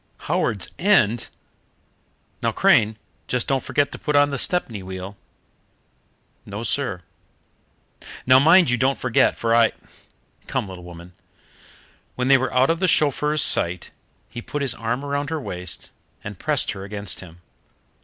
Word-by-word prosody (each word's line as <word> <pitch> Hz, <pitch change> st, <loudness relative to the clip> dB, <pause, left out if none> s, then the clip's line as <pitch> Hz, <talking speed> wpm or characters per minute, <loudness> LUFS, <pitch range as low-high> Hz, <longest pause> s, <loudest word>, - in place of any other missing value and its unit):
"Howards 100 Hz, -5 st, -1 dB
End? 120 Hz, -, +3 dB, 1.1 s
Now, -, -, +1 dB
Crane, 110 Hz, +1 st, +3 dB, 0.3 s
just 125 Hz, -1 st, -1 dB
don't 135 Hz, -1 st, +1 dB
forget 140 Hz, +2 st, 0 dB
to -, -, -8 dB
put 150 Hz, -, -2 dB
on 145 Hz, 0 st, +4 dB
the 140 Hz, -, -2 dB
Stepney 120 Hz, -, 0 dB
wheel." 95 Hz, +1 st, -7 dB, 1.3 s
"No, 100 Hz, +3 st, -7 dB
sir." 120 Hz, -9 st, -2 dB, 1.2 s
"Now, 130 Hz, +1 st, +7 dB
mind 165 Hz, +1 st, +5 dB
you 125 Hz, -, +1 dB
don't 135 Hz, +2 st, +1 dB
forget, 125 Hz, -3 st, +2 dB
for 115 Hz, 0 st, 0 dB
I 115 Hz, -1 st, +4 dB, 0.7 s
Come, -, -, -2 dB
little 95 Hz, -2 st, -10 dB
woman." 85 Hz, 0 st, -12 dB, 1.0 s
When 125 Hz, +1 st, -1 dB
they 135 Hz, -, +7 dB
were 130 Hz, -, -2 dB
out 130 Hz, +4 st, +3 dB
of 165 Hz, -, -2 dB
the 185 Hz, -, +1 dB
chauffeur's 150 Hz, -1 st, +2 dB
sight 85 Hz, +1 st, +1 dB, 0.4 s
he 120 Hz, -, -8 dB
put 145 Hz, +4 st, -4 dB
his 130 Hz, -3 st, +1 dB
arm 120 Hz, +3 st, -3 dB
around 140 Hz, 0 st, -2 dB
her 160 Hz, -1 st, -2 dB
waist 90 Hz, -, -6 dB, 0.3 s
and -, -, -8 dB
pressed -, -, 0 dB
her 95 Hz, -, -7 dB
against 100 Hz, -1 st, -5 dB
him. 85 Hz, -1 st, -13 dB
125 Hz, 150 wpm, -22 LUFS, 100-145 Hz, 1.3 s, Now